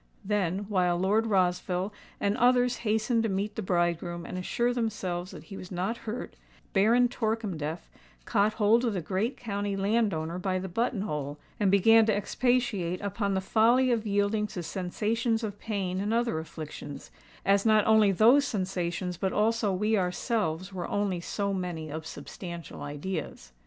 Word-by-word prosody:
Then, 195 -1 0
while 180 -4 +2
Lord 205 +5 +2
Rossville 185 0 +1 0.3
and 200 +1 +1
others 245 0 +3
hastened 220 +1 +1
to 225 - 0
meet 200 +2 -2
the 220 - -3
bridegroom 175 -2 -1
and - - -6
assure 240 +7 0
themselves 190 -7 -2
that - - -10
he 195 - -9
was 180 - -9
not 185 +5 -1
hurt, 235 +4 -5 0.4
Baron 230 +5 +5
Torkemdef 205 - -3 0.4
caught 210 -1 +2
hold 225 +2 +3
of 235 -3 +1
the 180 - -1
great 195 - -1
county 205 -3 -3
landowner 195 -5 0
by 185 0 0
the 185 +1 -4
button 225 +3 -1
hole, 150 -7 -3 0.2
and 205 - +3
began 220 +3 +6
to 215 - +3
expatiate 205 -5 0
upon 200 0 -1
the 190 - 0
folly 235 +6 +4
of 225 -2 0
yielding 205 +1 +1
to 180 -3 -6
sensations 220 +6 -1
of 205 -2 -4
pain 195 -4 -2
and 210 +3 0
other 235 -8 +1
afflictions, 150 -3 -8 0.3
as 200 0 +4
not 215 -2 +4
only 220 -2 +5
those 235 +9 +6
sensations 185 -5 -2
but 190 +1 -1
also 220 0 +1
we 210 +4 +1
ourselves 185 -1 -1
were 180 -2 -4
only 200 -3 0
so 200 +3 -2
many 175 -5 -4
unsubstantial 170 +2 -7
ideas. 145 - -5
200 Hz, 160 wpm, -28 LUFS, 180-220 Hz, 0.4 s, began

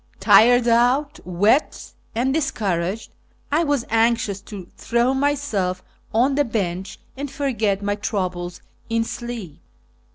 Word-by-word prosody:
Tired 225 +5 +6
out, 245 +5 +2
wet, 205 - +1 0.2
and 255 +3 +1
dis 315 -1 +1
couraged, 190 +1 -2 0.4
I 310 +4 +3
was 285 -6 0
anxious 225 -3 +1
to 200 -3 -9
throw 240 +3 +1
myself 265 -10 -1 0.3
on 250 +5 +2
the 290 +1 +2
bench 190 -6 -3 0.2
and 280 +1 -5
forget 220 -9 -1
my 205 0 0
troubles 185 -4 -3 0.3
in 230 0 +1
sleep. 230 - -7
225 Hz, 125 wpm, -22 LUFS, 195-260 Hz, 0.4 s, Tired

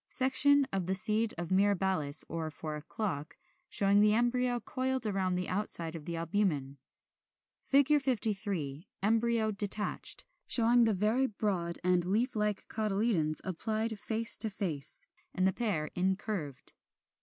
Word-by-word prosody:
Section 280 +2 +4
of 190 -3 -1
the 190 - +1
seed 215 +2 +3
of 175 +1 -5
Mirabilis 190 -6 +1
or 165 -1 -4
Four 155 0 -6
o'clock, 155 0 -5 0.3
showing 200 0 +4
the 210 0 +4
embryo 245 +1 +1
coiled 260 -1 -1
round 190 -3 -1
the 180 - -3
outside 175 -4 -1
of 155 -3 -8
the 170 - -4
albumen. 165 -6 -1 0.9
53. 215 - 0 0.2
Embryo 225 +1 +1
detached; 205 0 -1 0.2
showing 235 0 +4
the 220 -2 +2
very 220 +7 +1
broad 190 -6 -2
and 180 -1 +2
leaf 215 +9 0
like 210 -1 -1
cotyledons, 205 -7 0
applied 220 +4 -3
face 225 +2 +2
to 220 - +1
face, 190 - -3 0.3
and 185 - +1
the 190 - +2
pair 185 -10 -2
incurved. 185 - -3
205 Hz, 130 wpm, -31 LUFS, 175-225 Hz, 0.9 s, Section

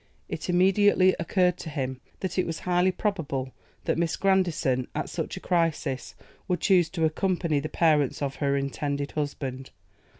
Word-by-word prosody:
It - - -5
immediately 185 +1 +4
occurred 180 +1 +1
to 160 - -6
him, 130 -3 -3 0.2
that 190 0 -2
it - - +1
was 165 -1 -4
highly 180 +1 +2
probable 150 -10 -2 0.3
that - - 0
Miss 170 -2 +1
Grandison, 170 -10 +1
at - - -3
such - - -4
a - - -4
crisis, 165 -6 -1 0.3
would 180 -2 0
choose 180 -4 +4
to 165 -2 0
accompany 170 -2 0
the 155 +2 -4
parents 150 -6 +2
of 135 -1 -3
her 140 -1 +1
intended 140 +1 -2
husband. 135 -3 -4
165 Hz, 160 wpm, -27 LUFS, 140-180 Hz, 0.3 s, immediately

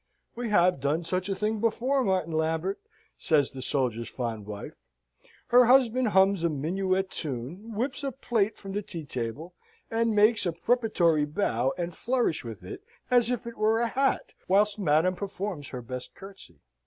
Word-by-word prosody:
"We 240 -1 -3
have 180 -6 +4
done 145 +5 0
such 185 +3 -2
a 195 - 0
thing 215 +2 -1
before, 255 +5 +1
Martin 185 -6 0
Lambert!" 160 +4 -1 0.4
says 150 -4 +2
the 130 - -8
soldier's 125 -4 -1
fond 115 -5 -4
wife. 105 -1 -7 0.8
Her 245 0 +7
husband 255 -1 +4
hums 190 -3 +3
a 170 - +3
minuet 185 +6 -1
tune; 160 - -5
whips 255 +6 -2
a 275 - -1
plate 225 -4 -1
from 195 - -8
the 205 +2 -2
tea 170 -5 -8
table, 130 +7 -5 0.4
and 225 -1 +1
makes 210 -1 +4
a 170 - -1
preparatory 175 -7 +2
bow 135 - 0
and 175 -1 -4
flourish 240 -9 0
with 110 -6 -8
it 90 - -8 0.3
as 245 -2 +4
if 245 -3 -2
it 235 0 -8
were 220 +1 +3
a 235 0 +1
hat, 270 +3 0
whilst 205 +2 +3
madam 175 +1 +2
performs 195 -5 -5
her 125 -2 -7
best 125 +1 -7
curtsey. 190 - -13
190 Hz, 170 wpm, -27 LUFS, 150-220 Hz, 0.8 s, Her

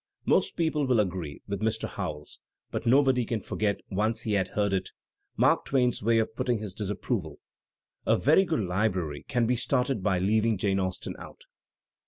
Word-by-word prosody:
Most - - +2
people 155 -4 0
will 125 -3 +3
agree 90 -7 -2
with 100 -1 -3
Mr. 110 0 -1
Howells, 75 0 -6 0.3
but - - -3
nobody 130 0 +4
can 115 0 -2
forget, 100 0 -2
once 110 +4 0
he 110 - -2
has 95 -2 +2
heard 100 -1 0
it, 95 - -1 0.5
Mark - - +3
Twain's 125 -3 +1
way 115 +2 +3
of 110 0 0
putting 120 0 0
his 105 -3 -6
disapproval: 100 - -3 0.7
"A - - +4
very 155 +8 +5
good 165 - -1
library 90 -5 -1
can 120 -2 +1
be 125 +2 +2
started 125 -1 0
by 95 -1 +1
leaving 110 +4 +2
Jane 95 0 +1
Austen 95 -1 -3
out." - - -12
110 Hz, 175 wpm, -28 LUFS, 95-120 Hz, 0.7 s, very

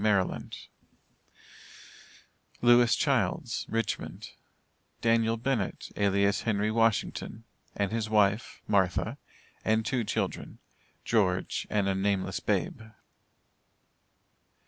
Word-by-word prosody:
Maryland; 100 -4 0 2.1
LEWIS 120 0 +6
CHILDS, 120 -3 0
Richmond, 115 -2 -3 0.7
DANIEL 115 0 +2
BENNETT, 115 -4 -2
alias 100 0 +2
HENRY 105 -1 0
WASHINGTON, 115 0 0 0.3
and 110 +2 -1
wife 105 +1 +1
(MARTHA,) 95 -4 +1 0.4
and 110 0 +1
two 125 0 0
children - - -3 0.5
(GEORGE 95 -5 0
and 100 -2 +1
a 95 - +2
nameless 95 0 -1
babe). - - -1
110 Hz, 80 wpm, -29 LUFS, 100-115 Hz, 2.1 s, LEWIS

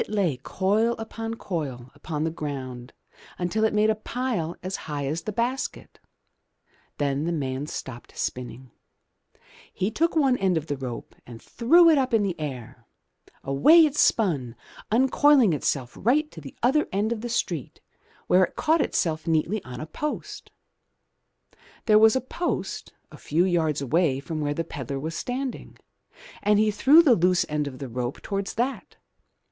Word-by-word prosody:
It - - -4
lay 195 -10 0
coil 205 - 0
upon 225 0 -5
coil 135 - -5
upon 150 +1 -4
the 160 - -1
ground 130 -5 -6 0.5
until 180 +5 -1
it 220 - +2
made 215 +1 +4
a - - +2
pile 215 -6 -3
as 185 +1 -3
high 145 -2 -3
as 155 +4 -2
the 215 - -4
basket. 245 +5 -3 1.0
Then 140 +1 -1
the 170 - -1
man 140 -3 -3
stopped 125 -5 -8
spinning. 125 0 -5 1.0
He 195 +4 -2
took 335 +9 0
one 270 -5 +3
end 190 -3 +1
of 155 - -3
the 145 - -3
rope 130 -3 -7
and 120 -2 -10
threw 335 - +4
it 315 -3 +6
up 255 -3 +1
in 215 - +3
the 195 -3 0
air. 130 -7 -7 0.6
Away 305 - +6
it 295 -2 -2
spun, 150 - +2 0.4
uncoiling 260 - +4
itself 135 -4 -2
right 300 +7 +1
to 160 - -11
the 140 - -11
other 285 +5 +3
end 205 +4 0
of 230 -2 -2
the 240 - -5
street 170 - -3 0.5
where 185 +1 +4
it - - -16
caught 320 +1 +2
itself 160 - -1
neatly 165 +6 0
on 125 -1 -8
a 155 - -5
post. 300 - -5 1.4
There 215 -2 +6
was 220 +1 +6
a 260 - +1
post 340 +7 -4 0.2
a - - -12
few 165 +4 +1
yards 160 -5 0
away 145 0 +1
from 155 +2 -5
where 145 0 -1
the 165 - -1
pedlar 140 -3 -5
was 160 +4 -4
standing, 255 +7 -5 0.6
and 210 0 +3
he 215 0 +3
threw 280 +10 +6
the 275 -7 +6
loose 180 -2 +2
end 150 -1 -2
of 130 -2 -7
the 135 - -6
rope 125 +1 -4
towards 200 -1 -3
that. 250 +4 -3
175 Hz, 170 wpm, -25 LUFS, 145-230 Hz, 1.4 s, it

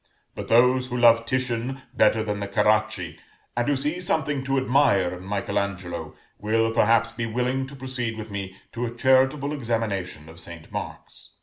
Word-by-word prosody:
But - - -7
those 125 +2 +4
who 125 -1 -3
love 115 -1 +5
Titian 130 +1 -2
better 110 -2 +3
than 105 -1 -3
the 100 - -3
Caracci, 105 -3 +1 0.4
and 120 0 0
who 145 - +2
see 150 +6 -2
something 150 -5 -1
to 135 0 0
admire 130 -9 +3
in 90 - -10
Michael 100 +1 -1
Angelo, 95 -3 -5 0.2
will, 115 +2 +1
perhaps, 115 0 +3
be 115 0 -4
willing 125 +3 -1
to 140 - -11
proceed 130 -4 -4
with 110 -1 -7
me 95 -2 -5 0.2
to 120 +1 -3
a 120 - -8
charitable 135 +3 +3
examination 110 - -3
of 80 +1 -12
St. 85 -2 -11
Mark's. - - -8
115 Hz, 175 wpm, -25 LUFS, 105-130 Hz, 0.4 s, love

